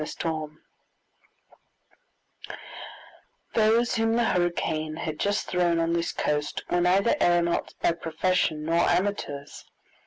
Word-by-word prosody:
Chapter -, -, -8 dB, 2.3 s
2 -, -, -6 dB, 1.0 s
Those 225 Hz, +2 st, +3 dB
whom 225 Hz, 0 st, +1 dB
the 235 Hz, +1 st, +2 dB
hurricane 165 Hz, -5 st, 0 dB
had 155 Hz, -1 st, -5 dB
just 205 Hz, +1 st, 0 dB
thrown 175 Hz, -2 st, +1 dB
on 165 Hz, 0 st, +1 dB
this 170 Hz, 0 st, 0 dB
coast 150 Hz, 0 st, -2 dB
were 175 Hz, -, +2 dB
neither 190 Hz, +8 st, +3 dB
aeronauts 175 Hz, -1 st, +2 dB
by -, -, +2 dB
profession 165 Hz, -1 st, -1 dB
nor 165 Hz, +1 st, +2 dB
amateurs. 175 Hz, -7 st, -1 dB
175 Hz, 115 wpm, -26 LUFS, 160-200 Hz, 2.3 s, Those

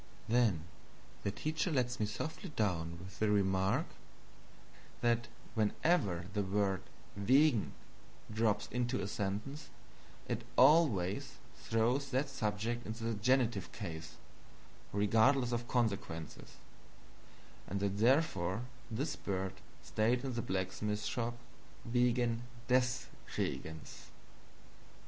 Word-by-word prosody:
Then 110 Hz, -9 st, +3 dB, 0.6 s
the -, -, 0 dB
teacher 155 Hz, -, -1 dB
lets 125 Hz, -3 st, 0 dB
me 105 Hz, -, +1 dB
softly 160 Hz, -, -4 dB
down 85 Hz, -5 st, 0 dB
with 95 Hz, +3 st, -11 dB
the 110 Hz, -, +2 dB
remark 95 Hz, -2 st, +2 dB, 1.2 s
that 120 Hz, -1 st, +2 dB, 0.3 s
whenever 105 Hz, -, +1 dB
the 105 Hz, -, +1 dB
word 95 Hz, -1 st, +1 dB, 0.3 s
"wegen" 125 Hz, +3 st, +4 dB, 0.6 s
drops 110 Hz, -2 st, +2 dB
into 125 Hz, +2 st, 0 dB
a 95 Hz, -, -2 dB
sentence, 105 Hz, +9 st, -3 dB, 0.6 s
it -, -, -2 dB
ALWAYS 125 Hz, -, +4 dB, 0.2 s
throws 120 Hz, +5 st, +1 dB
that 135 Hz, +2 st, 0 dB
subject 115 Hz, -1 st, -1 dB
into 110 Hz, +1 st, -5 dB
the 115 Hz, 0 st, 0 dB
GENITIVE 115 Hz, -3 st, +2 dB
case, 80 Hz, -6 st, -6 dB, 0.8 s
regardless 115 Hz, +6 st, +4 dB
of 120 Hz, 0 st, -1 dB
consequences 100 Hz, -, -2 dB, 1.1 s
and 100 Hz, -, -2 dB
therefore 100 Hz, -, +2 dB, 0.3 s
this 125 Hz, +7 st, -2 dB
bird 95 Hz, -1 st, -2 dB, 0.3 s
stayed 120 Hz, +4 st, +1 dB
in 130 Hz, -, -2 dB
the 120 Hz, -, -1 dB
blacksmith 105 Hz, +2 st, -2 dB
shop 120 Hz, -2 st, -2 dB, 0.5 s
"wegen 120 Hz, -1 st, +2 dB, 0.3 s
DES 125 Hz, 0 st, +2 dB, 0.3 s
Regens." 80 Hz, 0 st, -4 dB
110 Hz, 105 wpm, -35 LUFS, 100-125 Hz, 1.2 s, wegen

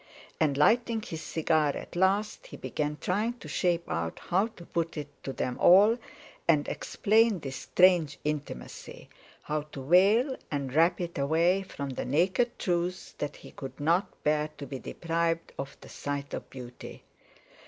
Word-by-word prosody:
And 145 Hz, -3 st, +2 dB
lighting 225 Hz, +7 st, +3 dB
his 165 Hz, -8 st, -6 dB
cigar 155 Hz, -3 st, +1 dB
at -, -, -9 dB
last, 200 Hz, -, +1 dB
he -, -, -10 dB
began 150 Hz, 0 st, -3 dB
trying 210 Hz, +6 st, 0 dB
to 240 Hz, -, -12 dB
shape 175 Hz, -2 st, 0 dB
out 80 Hz, 0 st, -2 dB
how 190 Hz, +5 st, +1 dB
to 215 Hz, -7 st, -14 dB
put 165 Hz, -1 st, -2 dB
it 145 Hz, -1 st, -5 dB
to 135 Hz, -, -3 dB
them 125 Hz, -1 st, -3 dB
all, 205 Hz, +5 st, +7 dB, 0.5 s
and 150 Hz, -3 st, +3 dB
explain 220 Hz, 0 st, +2 dB
this 135 Hz, -5 st, -6 dB
strange 175 Hz, +1 st, +3 dB
intimacy; 150 Hz, -, -5 dB, 0.3 s
how 150 Hz, 0 st, -1 dB
to 135 Hz, -2 st, -7 dB
veil 205 Hz, -, +5 dB
and 140 Hz, -3 st, -3 dB
wrap 165 Hz, +4 st, +4 dB
it 170 Hz, -4 st, -4 dB
away 165 Hz, +7 st, +3 dB
from 140 Hz, -7 st, -6 dB
the 130 Hz, -, -4 dB
naked 185 Hz, -, +1 dB
truth—that 175 Hz, -4 st, -2 dB
he -, -, -13 dB
could 135 Hz, -1 st, -9 dB
not 170 Hz, +6 st, +2 dB
bear 150 Hz, 0 st, +1 dB
to 145 Hz, -, -6 dB
be 135 Hz, 0 st, -6 dB
deprived 165 Hz, +1 st, -2 dB
of 135 Hz, +1 st, -5 dB
the -, -, -12 dB
sight 145 Hz, 0 st, -4 dB
of -, -, -5 dB
beauty. 125 Hz, -2 st, -10 dB
165 Hz, 160 wpm, -29 LUFS, 145-190 Hz, 0.5 s, all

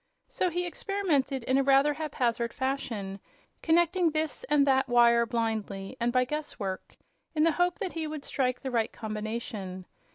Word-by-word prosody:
So 365 Hz, -, 0 dB
he 355 Hz, +1 st, -2 dB
experimented 325 Hz, -, -1 dB
in 260 Hz, +3 st, +2 dB
a -, -, +3 dB
rather 275 Hz, +2 st, +4 dB
haphazard 245 Hz, -6 st, -1 dB
fashion, 230 Hz, -8 st, -3 dB, 0.4 s
connecting 345 Hz, +1 st, +3 dB
this 310 Hz, -2 st, -2 dB
and 290 Hz, 0 st, +3 dB
that 265 Hz, -1 st, +2 dB
wire 235 Hz, -1 st, +5 dB
blindly 220 Hz, -3 st, -2 dB
and 235 Hz, 0 st, +1 dB
by 255 Hz, 0 st, +3 dB
guesswork, 250 Hz, -10 st, -5 dB, 0.4 s
in 305 Hz, -, +3 dB
the 330 Hz, -, +5 dB
hope 355 Hz, +3 st, +1 dB
that 390 Hz, -5 st, -4 dB
he 320 Hz, -1 st, -3 dB
would 305 Hz, -2 st, -6 dB
strike 255 Hz, -2 st, -1 dB
the 265 Hz, -, -4 dB
right 230 Hz, -2 st, +1 dB
combination. 215 Hz, -4 st, -5 dB
265 Hz, 160 wpm, -29 LUFS, 230-310 Hz, 0.4 s, wire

